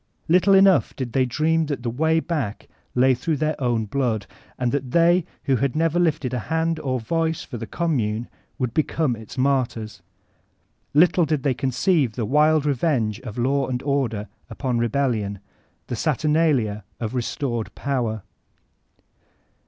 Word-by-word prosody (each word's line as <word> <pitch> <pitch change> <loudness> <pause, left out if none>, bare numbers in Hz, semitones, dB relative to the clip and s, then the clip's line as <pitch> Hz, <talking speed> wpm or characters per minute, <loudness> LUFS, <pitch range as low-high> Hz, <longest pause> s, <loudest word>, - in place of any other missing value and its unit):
Little 185 +4 +5
enough 195 -1 +5
did 125 -4 -5
they 130 -2 +2
dream 160 +5 +1
that 140 -4 -4
the 120 - -1
way 160 +6 +2
back 150 -11 -3 0.3
lay 130 +1 +5
through 150 +5 -1
their 155 +1 0
own 120 -3 +1
blood, 115 -3 -1 0.3
and 125 -1 0
that 135 -2 -2
they, 170 +4 +4 0.2
who 135 -2 +2
had 135 +2 -1
never 165 +2 +1
lifted 150 -7 0
hand 160 +6 -1
or 130 -4 -1
voice 160 +6 -1
for 125 - -7
the 115 0 -6
Commune, 120 - -1 0.3
would 125 -3 -2
become 155 -4 0
its 110 +2 -11
martyrs. 130 -5 -1 0.9
Little 175 +2 +5
did 150 -3 -1
they 140 - +2
conceive 130 - +1
the 115 -2 -2
wild 150 +4 +3
revenge 125 -6 0
of 120 -4 -8
Law 135 +3 +1
and 125 0 -3
Order 130 -7 -1 0.2
upon 125 +1 -2
Rebellion, 115 -4 0 0.5
the - - -4
saturnalia 150 -10 +1 0.2
of 110 -1 -3
restored 120 -2 -2
Power. 120 -7 -2
135 Hz, 150 wpm, -23 LUFS, 120-155 Hz, 0.9 s, Little